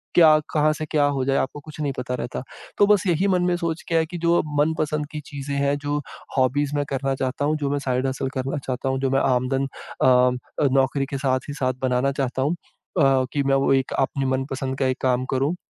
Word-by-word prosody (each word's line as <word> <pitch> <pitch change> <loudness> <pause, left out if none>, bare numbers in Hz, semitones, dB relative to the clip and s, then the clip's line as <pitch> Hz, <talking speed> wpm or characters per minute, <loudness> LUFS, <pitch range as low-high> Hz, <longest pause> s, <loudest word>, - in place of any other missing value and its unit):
क्या 155 -3 +7 0.2
कहाँ 155 0 +3
से 155 0 -4
क्या 150 -1 +2
हो 130 - 0
जाए 135 0 +2
आपको 140 - -2
कुछ 155 +1 -12
नहीं 145 -2 0
पता 125 0 -3
रहता। 125 0 -4 0.4
तो 205 - +5
बस 205 -2 +4
यही 180 +3 +2
मन 180 -2 +2
में 180 0 +2
सोच 170 -1 -2
के 165 - -1
है 160 -1 +3
कि 175 +2 -7
जो 170 +1 +4 0.2
मन 155 +2 +3
पसंद 150 -1 -1
की 150 - -5
चीज़ें 140 0 -5
हैं 140 0 +1
जो 145 0 -2 0.4
हॉबीज 135 +3 +2
मैं 145 0 0
करना 135 0 -1
चाहता 130 +2 -2
हूँ, 155 +1 +1
जो 145 -2 -2
मैं 145 - 0
साइड 130 -1 -1
हसल 130 0 -2
करना 135 +3 -2
चाहता 130 +1 -2
हूँ, 130 0 0
जो 135 - 0
मैं 135 - +3
आमदन 130 +1 +1
अ, 125 +1 +1
नौकरी 135 +1 +2
के 140 0 -4
साथ 130 0 -1
ही - - -3
साथ 130 -2 0
बनाना 130 +1 +1
चाहता 130 -2 -2
हूँ। 145 +5 +1
अ, 135 -5 0
कि 145 -2 +1
मैं 135 0 +2
वो 135 0 +3
एक 135 -1 +1
अपनी 135 0 0
मनपसंद 130 0 -2
का 130 - +2
एक 130 - -2
काम 130 -1 +1
करूँ 140 +7 +1
135 Hz, 235 wpm, -23 LUFS, 130-150 Hz, 0.4 s, क्या